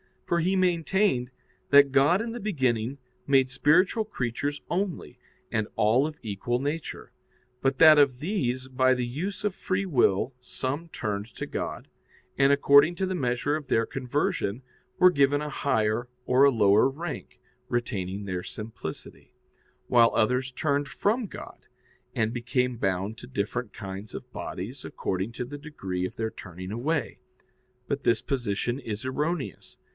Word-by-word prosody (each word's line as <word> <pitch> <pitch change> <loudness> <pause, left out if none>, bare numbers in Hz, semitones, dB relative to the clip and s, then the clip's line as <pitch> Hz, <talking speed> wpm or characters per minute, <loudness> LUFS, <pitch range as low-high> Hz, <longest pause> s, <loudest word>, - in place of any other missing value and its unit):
For 170 - +1
he 185 +4 +1
maintained 180 -6 +2 0.4
that 140 -1 +7
God 145 +8 +4
in 230 0 -3
the 240 - -5
beginning 130 - 0 0.3
made 135 -2 +4
spiritual 180 - +3
creatures 145 - -3
only, 185 0 -3 0.3
and 110 -1 0
all 120 +7 +3
of 155 -1 -8
equal 110 +3 -2
nature; 145 +4 -4 0.5
but 135 0 +1
that 155 -2 +9
of 135 -3 +4
these 130 - -1
by 130 0 +3
the 125 -1 -1
use 165 +14 -4
of 210 -2 0
free 190 0 -2
will 125 - +2
some 135 +5 -4
turned 105 -8 -3
to - - -4
God, - - -5 0.5
and, 135 0 +5
according 140 +3 +6
to 190 - -1
the 185 - -2
measure 135 -1 0
of 150 -3 -9
their 115 -2 +2
conversion, 130 -3 -2 0.3
were 180 0 +7
given 140 -2 +3
a 150 - -3
higher 110 -4 0 0.2
or 130 +2 +5
a - - +7
lower 110 0 +4
rank, 155 +4 -6 0.3
retaining 100 -5 -2
their 95 -3 -3
simplicity; 105 -5 -8 0.5
while 120 -2 +5
others 125 +4 +1
turned 145 +1 0
from 220 - 0
God, - - -10 0.6
and 110 +1 0
became 125 0 -1
bound 95 +1 -1
to 120 - -10
different 120 0 -3
kinds 95 +2 -7
of - - -8
bodies - - -6
according 95 +5 -3
to 125 - -4
the 145 +4 -8
degree 95 - -4
of - - -6
their 110 -1 -2
turning 90 +1 -9
away. 145 +9 -2 0.7
But 140 -1 -2
this 115 - +3
position 120 -2 -2
is 115 -1 -5
erroneous. 150 +3 -3
130 Hz, 150 wpm, -27 LUFS, 115-150 Hz, 0.7 s, that